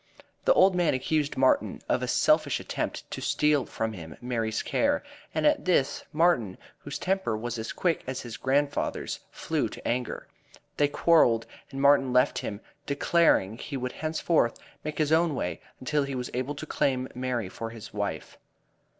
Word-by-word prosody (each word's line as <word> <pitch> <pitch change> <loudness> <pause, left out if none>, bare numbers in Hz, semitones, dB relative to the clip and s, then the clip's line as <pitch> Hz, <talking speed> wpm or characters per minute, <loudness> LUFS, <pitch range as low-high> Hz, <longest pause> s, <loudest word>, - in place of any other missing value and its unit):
The - - +6
old 190 - +6
man 175 -6 +2
accused 145 +3 -1
Martin 130 0 +2
of - - +1
a - - -2
selfish - - +3
attempt - - -4
to - - -5
steal 150 -4 +2
from 110 0 -3
him 80 -6 -9
Mary's 115 -3 -2
care, 290 0 +1 0.3
and - - +1
at 295 -1 +3
this, 170 -7 +2
Martin, 150 - +2 0.2
whose - - -6
temper 190 - 0
was 120 +1 -4
as 110 - -4
quick 170 -3 0
as 130 0 -3
his 120 -2 -7
grandfather's 140 +2 -1
flew - - -2
to - - -8
anger. 125 +1 -2 0.5
They 145 - +4
quarreled 145 -6 +4 0.2
and 135 - -6
Martin 140 -2 +5
left 125 0 +3
him, 100 0 -5 0.3
declaring 140 - +2
he 140 - -5
would 125 0 -3
henceforth 160 -4 0 0.3
make 155 0 -4
his 155 -1 +1
own 160 -1 +3
way 90 -8 -3 0.2
until 150 +3 0
he 140 -1 -3
was 125 -1 -4
able 130 +4 -2
to 150 - -6
claim 130 -4 0
Mary 125 -4 -2
for 115 +4 -6
his 115 -2 -10
wife. 100 -6 -4
135 Hz, 170 wpm, -28 LUFS, 115-155 Hz, 0.5 s, The